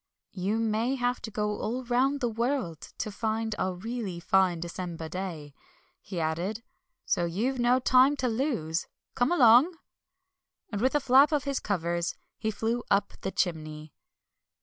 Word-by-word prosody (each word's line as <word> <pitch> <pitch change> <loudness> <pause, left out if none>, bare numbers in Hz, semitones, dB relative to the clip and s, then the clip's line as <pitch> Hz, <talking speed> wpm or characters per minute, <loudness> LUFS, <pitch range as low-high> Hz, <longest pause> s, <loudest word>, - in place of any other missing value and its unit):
"You 195 +3 -1
may 225 +3 0
have 245 -1 -1
to 225 - -6
go 210 0 -2
all 245 +4 -2
round 260 +4 +1
the 245 - +2
world 230 - -1 0.2
to 215 - -3
find 220 +1 -2
a 185 - 0
really 200 -1 -5
fine 185 -1 +2
December 170 -1 -5
day," 160 -4 -6 0.5
he 185 -2 -5
added, 175 +8 -2 0.4
"so 175 - +1
you've 230 +10 -1
no 240 +1 +4
time 260 +2 +5
to 260 -3 -1
lose. 225 - -1 0.3
Come 245 +5 +1
along!" 280 +3 +6 0.9
And 205 -1 -3
with 260 +4 +2
a - - +5
flap 270 +2 +5
of 295 -3 +1
his 280 -1 -1
covers 170 -3 -1 0.2
he 220 - -1
flew 225 +3 -1
up 200 0 +2
the 190 - -2
chimney. 155 -5 -3
220 Hz, 155 wpm, -28 LUFS, 180-250 Hz, 0.9 s, along